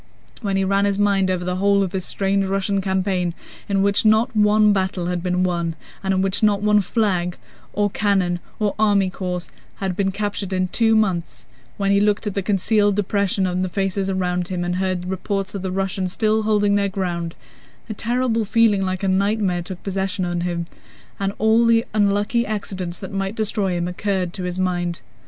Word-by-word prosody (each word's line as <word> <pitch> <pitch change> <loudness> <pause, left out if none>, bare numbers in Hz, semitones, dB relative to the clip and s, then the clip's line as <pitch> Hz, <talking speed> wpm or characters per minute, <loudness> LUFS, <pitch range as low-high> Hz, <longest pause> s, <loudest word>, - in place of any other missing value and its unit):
When 200 -3 0
he 195 - +1
ran 195 +1 +2
his 200 -1 +1
mind 200 -2 +2
over 180 -1 -1
the 180 0 -1
whole 200 +1 +3
of 185 - -3
this 190 -2 -3
strange 195 0 0
Russian 195 +1 0
campaign 190 -2 0 0.3
in 195 -1 +2
which 200 0 +2
not 220 +3 +3
one 210 0 +5
battle 190 -2 -1
had 175 0 -2
been 180 0 0
won, 170 -2 -1 0.3
and 195 - 0
in 190 0 +2
which 195 +1 0
not 205 -2 +3
a 210 0 +5
flag, 180 -4 0 0.3
or 205 -1 0
cannon, 190 -4 +1 0.2
or 210 -2 +1
army 200 -3 +3
corps 180 -2 -4 0.3
had 190 -2 -3
been 195 0 +1
captured 205 -1 -3
in 185 -1 0
two 225 +3 +3
months, 170 - 0 0.3
when 195 -1 +1
he 200 0 +4
looked 210 +1 +1
at 205 - -2
the 200 - -1
concealed 205 +1 +2
depression 200 -1 0
on 180 0 -1
the 185 - -1
faces 195 +1 -1
around 180 -2 -1
him 180 -1 -2
and 175 +1 -1
heard 185 -1 -1
reports 195 +2 -3
of 200 - -4
the 190 -1 -3
Russians 190 -1 -1
still 215 +2 +1
holding 210 -1 +2
their 200 -1 +2
ground—a 180 +3 -6
terrible 235 +1 0
feeling 215 -2 +3
like 185 0 -2
a - - +1
nightmare 195 -1 +1
took 180 +1 -8
possession 190 -1 -2
of 175 0 -2
him, 170 -1 -2 0.5
and 195 0 0
all 220 +2 +4
the 230 0 +4
unlucky 205 +3 +2
accidents 190 -5 -4
that 190 0 -8
might 195 +1 -2
destroy 210 -3 -1
him 175 0 -1
occurred 180 -1 -2
to 185 - -5
his 180 0 -3
mind. 175 -4 -1
195 Hz, 195 wpm, -21 LUFS, 185-205 Hz, 0.5 s, one